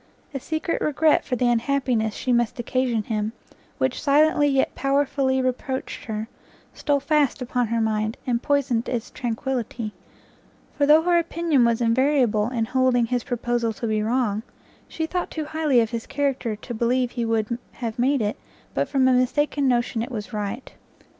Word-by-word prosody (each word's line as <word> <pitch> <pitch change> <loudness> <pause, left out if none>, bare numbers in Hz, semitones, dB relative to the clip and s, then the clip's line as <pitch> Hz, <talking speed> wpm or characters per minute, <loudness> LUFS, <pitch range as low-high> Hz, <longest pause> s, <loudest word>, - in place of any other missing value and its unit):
A 275 - -3
secret 315 +4 -2
regret 305 +1 +3
for 255 - -2
the 245 0 +1
unhappiness 240 -2 +1
she 250 - -1
must 240 -1 +1
occasion 240 -2 0
him, 215 0 -2 0.4
which 260 -1 -1
silently 295 +1 +4
yet 270 -2 +1
powerfully 275 -1 +1
reproached 255 +1 -3
her, 220 -1 -4 0.5
stole 290 -1 0
fast 290 0 +1
upon 250 -1 -1
her 230 +1 0
mind, 215 +1 0
and 240 -2 0
poisoned 280 -5 0
its 235 -3 -3
tranquility; 235 -2 -3 0.8
for 285 -1 +2
though 310 +2 +6
her 345 0 +4
opinion 330 -6 +1
was 235 0 +1
invariable 235 -2 +2
in 235 -3 -1
holding 255 -1 +2
his 245 0 -1
proposal 240 -2 -1
to 230 - -5
be 215 -1 0
wrong, 220 -2 0 0.5
she 320 - -3
thought 355 +2 -3
too 310 -2 -4
highly 305 -4 +2
of 225 - -1
his 230 -1 -4
character 275 -5 -1
to 225 +4 -8
believe 245 +2 +1
he 240 - -3
would 225 +1 -1
have 230 -1 -5
made 260 0 +2
it 210 - -2 0.4
but - - -1
from 265 -2 +3
a 260 - +4
mistaken 275 +3 +1
notion 240 -2 +1
it 235 - -4
was 220 -2 -6
right. 210 +4 -4
250 Hz, 170 wpm, -24 LUFS, 230-280 Hz, 0.8 s, though